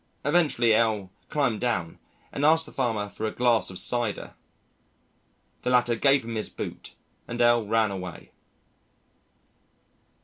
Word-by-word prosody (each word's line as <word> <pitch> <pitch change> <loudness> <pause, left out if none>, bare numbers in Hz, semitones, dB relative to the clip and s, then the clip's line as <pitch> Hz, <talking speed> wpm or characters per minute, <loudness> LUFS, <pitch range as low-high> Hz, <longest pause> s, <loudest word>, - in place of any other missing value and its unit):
Eventually 145 -7 +3
L 110 -4 +1 0.2
climbed 140 -7 0
down 95 -10 -2 0.3
and 140 - -4
asked 160 +2 +4
the - - -13
farmer 115 -6 -1
for 110 +2 -4
a - - -3
glass 120 -2 +2
of 95 - -7
cider. 120 -2 0 1.3
The - - -2
latter 125 -1 +3
gave 135 +1 +3
him 115 - -5
his 110 -1 -2
boot - - -8 0.3
and 120 - -6
L 120 -2 +3
ran 110 -1 +2
away. 90 -3 -8
115 Hz, 135 wpm, -26 LUFS, 110-125 Hz, 1.3 s, asked